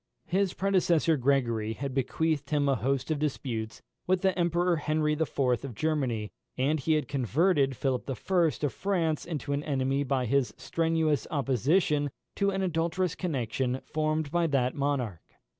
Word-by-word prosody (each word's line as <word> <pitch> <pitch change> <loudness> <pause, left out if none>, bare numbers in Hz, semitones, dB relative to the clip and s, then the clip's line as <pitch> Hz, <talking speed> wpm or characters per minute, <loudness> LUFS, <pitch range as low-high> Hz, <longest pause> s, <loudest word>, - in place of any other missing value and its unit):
His 190 +2 0
predecessor 175 -4 +2
Gregory 120 -5 +1
had 135 +3 -4
bequeathed 150 +3 0
him 145 -2 +1
a 140 - +4
host 135 +3 -1
of 155 - 0
disputes 125 -7 -3 0.2
with 185 0 +2
the 190 -1 +3
Emperor 175 0 +2
Henry 155 0 +1
IV. 160 0 -2 0.3
of 135 -5 -6
Germany, 125 -7 -1 0.3
and 145 +4 +1
he 160 +4 +1
had 155 -1 0
converted 140 - +1
Philip 130 -1 -1
I. - - 0 0.5
of 145 - 0
France 170 -6 0
into 145 -4 -3
an 140 - 0
enemy 135 -1 0
by 130 -2 0
his 135 +1 +1
strenuous 160 -5 0
opposition 145 - +1 0.3
to 200 -1 +2
an 195 0 -1
adulterous 170 0 0
connexion 130 -5 -2
formed 155 -1 -1
by 170 0 +2
that 130 -4 +1
monarch. 135 - -1
145 Hz, 155 wpm, -29 LUFS, 130-165 Hz, 0.5 s, a